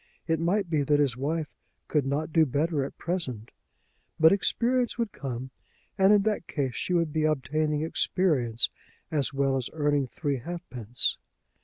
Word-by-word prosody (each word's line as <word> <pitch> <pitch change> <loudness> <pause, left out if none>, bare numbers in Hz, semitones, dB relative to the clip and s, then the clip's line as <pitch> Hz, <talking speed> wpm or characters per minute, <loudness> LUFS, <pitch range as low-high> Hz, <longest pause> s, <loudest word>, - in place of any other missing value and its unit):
It 160 -1 0
might 185 +4 +1
be 155 -3 +1
that 145 +1 +2
his 140 -5 +2
wife 150 +3 -2 0.3
could 145 -3 +1
not 150 +3 -2
do 160 - +6
better 145 +1 0
at 135 - -7
present; 135 - -4 0.7
but 160 0 +7
experience 240 +5 +1
would 230 -4 -1
come, 130 -1 -5 0.4
and 195 0 +5
in 205 -1 +5
that 210 -5 -1
case, 135 -4 -2
she 145 - -3
would 165 -3 +1
be 155 -1 +1
obtaining 155 +1 0
experience 145 -8 +1 0.4
as 140 -6 0
well 135 -1 +1
as 125 - -3
earning 145 -3 +1
three 140 +2 -2
halfpence. 125 - -2
150 Hz, 160 wpm, -27 LUFS, 135-170 Hz, 0.7 s, but